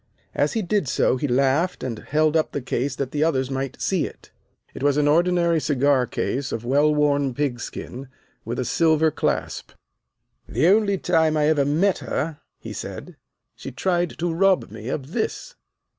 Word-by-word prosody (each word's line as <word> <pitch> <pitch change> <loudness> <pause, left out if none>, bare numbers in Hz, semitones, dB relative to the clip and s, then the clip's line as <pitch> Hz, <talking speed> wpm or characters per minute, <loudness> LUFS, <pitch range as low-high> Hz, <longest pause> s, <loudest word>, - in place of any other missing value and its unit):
As - - +1
he 225 -2 -1
did 190 -3 0
so 130 - +2
he 145 - -1
laughed 140 +7 +1
and 115 -4 -4
held 155 +1 +1
up 160 - +1
the 145 - -2
case 130 +2 -2
that 135 -2 -3
the 150 0 0
others 135 -5 0
might 135 0 -4
see 190 -4 0
it. - - -15 0.4
It - - -9
was 145 0 +2
an 145 -1 +3
ordinary 170 +1 +3
cigar 140 -3 +2
case 130 +2 -2
of 115 +1 -4
well 145 +4 +3
worn 145 -3 +1
pig 140 -4 -1
skin, 130 +2 -7 0.4
with 115 +2 -4
a 130 - -1
silver 160 +1 +3
clasp. - - -2 0.8
"The 125 - +1
only 200 -1 +3
time 160 -4 +2
I 150 0 +3
ever 145 -3 +2
met 170 +7 +2
her," 155 -1 -3 0.2
he - - -8
said, - - -7 0.4
"she 135 - -8
tried 175 +5 -1
to 170 0 -1
rob 190 +2 +2
me 110 - -9
of 135 +1 -4
this." 240 - -3
150 Hz, 180 wpm, -23 LUFS, 135-170 Hz, 0.8 s, an